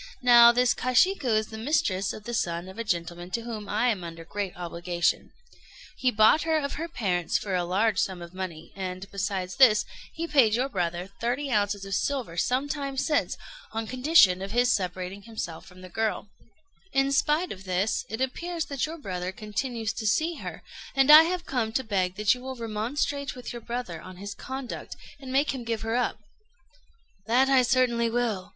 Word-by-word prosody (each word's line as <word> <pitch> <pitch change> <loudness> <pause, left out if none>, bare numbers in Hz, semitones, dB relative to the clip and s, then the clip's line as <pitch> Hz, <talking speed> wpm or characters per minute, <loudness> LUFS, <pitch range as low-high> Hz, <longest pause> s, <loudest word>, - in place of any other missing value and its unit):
Now, 240 -1 +9
this 245 0 +3
Kashiku 255 - +2
is 215 - -1
the 220 - -8
mistress 200 -7 0
of 215 - -9
the 240 +2 -6
son 175 -5 -1
of 190 +4 -10
a - - -1
gentleman 175 -3 -3
to - - -6
whom 220 -3 -6
I 225 +4 +2
am 200 -6 -1
under 165 -1 -8
great 200 +1 -3
obligation: 175 0 -1 0.7
he 255 -3 +1
bought 220 +6 +5
her 320 -1 +1
of 280 -2 -2
her 330 +2 -4
parents 180 - 0
for 200 - -4
a 180 -1 +1
large 195 +4 +1
sum 190 -2 -1
of 170 0 -10
money, 180 -4 -7
and, 185 -1 -5
besides 195 -2 -3
this, 240 -6 +6 0.3
he 330 - -3
paid 265 -9 +4
your 255 +3 0
brother 180 -3 -3
thirty 250 +4 -1
ounces 205 -2 0
of 195 - -5
silver 250 -5 -1
some 255 +10 0
time 280 -2 -4
since, 295 +2 0 0.4
on 225 0 -2
condition 250 - +4
of 195 +2 -5
his 245 0 +4
separating 185 +1 -3
himself 200 -7 -7
from 185 0 -15
the 185 - -9
girl; 215 +2 -2 0.6
in 270 0 +2
spite 300 +5 +2
of 190 -1 -8
this, 185 +3 0
it 220 +3 -4
appears 330 +6 -2
that 280 0 -2
your 325 +2 -7
brother 185 - -4
continues 225 +2 -3
to 220 - -3
see 315 +10 +1
her, - - -7 0.3
and 270 +2 +5
I 310 +2 +11
have 355 +1 -2
come 235 -4 -1
to 260 - 0
beg 190 -5 -1
that 210 +2 +3
you 250 - -8
will 260 +1 -6
remonstrate 245 +6 -2
with 250 -1 -7
your 240 - -7
brother 230 -8 -5
on 185 -1 -11
his 200 +2 -6
conduct, 260 +4 -7 0.2
and 265 -2 -8
make 275 +3 +2
him 260 -3 -5
give 230 -2 -3
her 225 +1 -2
up." 245 -3 0 1.1
"That 255 +4 +4
I 265 -1 +6
certainly 240 -2 +2
will. 225 -5 -1
225 Hz, 195 wpm, -27 LUFS, 190-260 Hz, 1.1 s, I